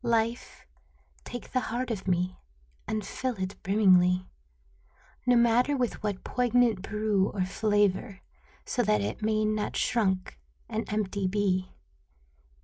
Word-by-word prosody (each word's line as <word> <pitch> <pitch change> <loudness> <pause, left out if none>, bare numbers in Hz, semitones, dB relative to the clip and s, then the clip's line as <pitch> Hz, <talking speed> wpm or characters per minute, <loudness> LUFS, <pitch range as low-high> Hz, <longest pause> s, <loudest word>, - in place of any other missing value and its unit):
Life, 230 0 -1 0.6
take 245 - -7
the 255 - +2
heart 245 +2 -2
of 195 -4 -4
me 180 0 0 0.5
And 215 -2 -2
fill 255 +3 -3
it 190 +1 -4
brimmingly, 185 -3 +4 1.0
No 245 - +5
matter 240 +4 +3
with 245 -3 -1
what 205 -3 -3
poignant 245 -4 +2
brew 210 -1 0
or 190 -3 -1
flavor. 205 0 0 0.4
So - - 0
that 105 -1 +2
it 105 +3 -3
may 215 0 +1
not 215 0 -1
shrunk 190 - 0 0.3
and 220 0 -4
empty 200 -2 -1
be. 185 -1 0
210 Hz, 130 wpm, -28 LUFS, 190-230 Hz, 1.0 s, No